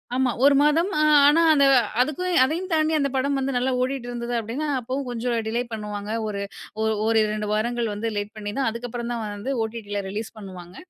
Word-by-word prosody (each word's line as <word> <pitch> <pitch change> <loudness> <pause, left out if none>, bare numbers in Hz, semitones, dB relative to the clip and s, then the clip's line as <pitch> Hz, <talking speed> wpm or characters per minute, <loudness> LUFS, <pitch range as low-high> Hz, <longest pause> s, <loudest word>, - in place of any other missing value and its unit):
ஆமா 255 -1 +2
1 285 0 +6
மாதம் 310 +5 +3 0.4
ஆனா 305 +3 +5
அந்த 280 -3 +5 0.4
அதுக்கும், 350 +7 -1
அதையும் 330 +8 -1
தாண்டி 310 0 +2
அந்த 280 -2 +1
படம் 275 +1 +1
வந்து 270 0 -2
நல்லா 250 +2 +1
ஓடிட்டிருந்தது 245 -2 -3
அப்டின்னா, 235 +8 -4
அப்பவும் 255 +3 -4
கொஞ்சம் 240 0 -2
டிலே 230 +2 0
பண்ணுவாங்க. 210 -1 -5 0.2
ஒரு 200 -1 -3 0.4
ஓ - - +1 0.2
1,2 215 -1 +1
வாரங்கள் 235 +2 0
வந்து, 210 +3 -3
லேட் 205 +1 -3
பண்ணி 205 -1 -5
தான், 270 - +1
அதுக்கப்பறம் 235 +1 -5
தான் 230 -2 -3
வந்து 260 +7 -3
ஓடிடில 215 -2 -4
ரிலீஸ் 215 +3 -4
பண்ணுவாங்க. 185 -3 -10
240 Hz, 175 wpm, -24 LUFS, 215-275 Hz, 0.4 s, 1